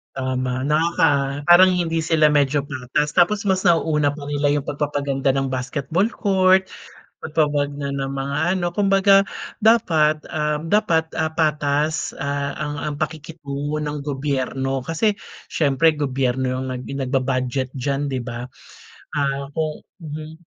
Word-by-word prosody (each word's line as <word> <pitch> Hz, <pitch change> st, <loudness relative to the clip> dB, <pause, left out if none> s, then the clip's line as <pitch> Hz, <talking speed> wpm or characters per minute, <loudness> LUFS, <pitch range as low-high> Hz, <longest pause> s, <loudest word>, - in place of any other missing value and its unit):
Tama, 130 Hz, -1 st, -2 dB
nakaka 145 Hz, -2 st, +1 dB
parang 185 Hz, +2 st, +8 dB
hindi 165 Hz, -2 st, -1 dB
sila 155 Hz, -2 st, +4 dB
medyo 145 Hz, -1 st, +2 dB
patas. 145 Hz, +2 st, -3 dB
Tapos 200 Hz, +3 st, +3 dB
mas 190 Hz, 0 st, +1 dB
nauuna 155 Hz, -4 st, +2 dB
pa 145 Hz, -1 st, -8 dB
nila 145 Hz, 0 st, +1 dB
'yong 145 Hz, -1 st, -2 dB
pagpapaganda 140 Hz, -2 st, -1 dB
ng 135 Hz, 0 st, -1 dB
basketball 130 Hz, +7 st, -1 dB
court, 190 Hz, -1 st, +3 dB, 0.5 s
pagpapaganda 145 Hz, -2 st, -1 dB
ng 135 Hz, -1 st, -3 dB
mga 135 Hz, +1 st, -3 dB, 0.2 s
ano. 175 Hz, -1 st, -2 dB
Kumbaga, 195 Hz, 0 st, +4 dB, 0.4 s
dapat, 160 Hz, -9 st, +3 dB
uhm, 150 Hz, 0 st, -2 dB
dapat, 165 Hz, -4 st, +1 dB
ah, 160 Hz, 0 st, 0 dB
patas, 155 Hz, -1 st, 0 dB
ah, 140 Hz, 0 st, -3 dB
ang 150 Hz, -1 st, -3 dB, 0.2 s
ang -, -, -4 dB
pakikitungo 150 Hz, -2 st, -4 dB
ng 150 Hz, -1 st, -4 dB
gobyerno. 135 Hz, -2 st, -2 dB
Kasi 165 Hz, -, 0 dB, 0.3 s
siyempre, 155 Hz, +1 st, +2 dB
gobyerno 130 Hz, -3 st, -1 dB
ang 130 Hz, 0 st, -4 dB
nag 125 Hz, -, -6 dB, 0.2 s
nagba-budget 130 Hz, 0 st, -1 dB
diyan, 140 Hz, +2 st, -1 dB
'di 130 Hz, -, -2 dB
ba? 120 Hz, 0 st, -6 dB, 0.7 s
Ah, 140 Hz, -1 st, -1 dB
kung 155 Hz, -1 st, -2 dB, 0.2 s
mhm. 155 Hz, +1 st, -7 dB
145 Hz, 130 wpm, -21 LUFS, 135-160 Hz, 0.7 s, parang